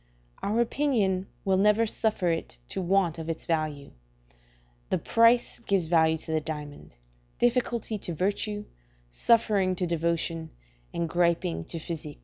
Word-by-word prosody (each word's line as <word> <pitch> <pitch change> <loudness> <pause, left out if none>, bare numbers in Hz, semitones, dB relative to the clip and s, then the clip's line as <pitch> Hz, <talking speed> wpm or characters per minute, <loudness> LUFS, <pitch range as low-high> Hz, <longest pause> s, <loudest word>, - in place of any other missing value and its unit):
Our 220 +4 +1
opinion 225 -8 +1 0.2
will 190 -1 +3
never 210 +3 +4
suffer 215 -5 0
it 165 - -4
to - - -2
want 180 -2 +1
of 160 0 -5
its 165 - -4
value: 155 -4 -2 1.0
the - - +2
price 230 +1 +3
gives 195 -6 0
value 160 -1 +3
to 160 - -7
the 160 -1 +1
diamond; 150 -2 -7 0.4
difficulty 240 -3 0
to 175 -3 -4
virtue; 205 +4 -1 0.5
suffering 200 - +3
to 180 - -1
devotion; 165 -1 -1 0.4
and 170 0 -2
griping 165 - +1
to - - -4
physic. 155 -2 -6
180 Hz, 135 wpm, -27 LUFS, 160-210 Hz, 1.0 s, never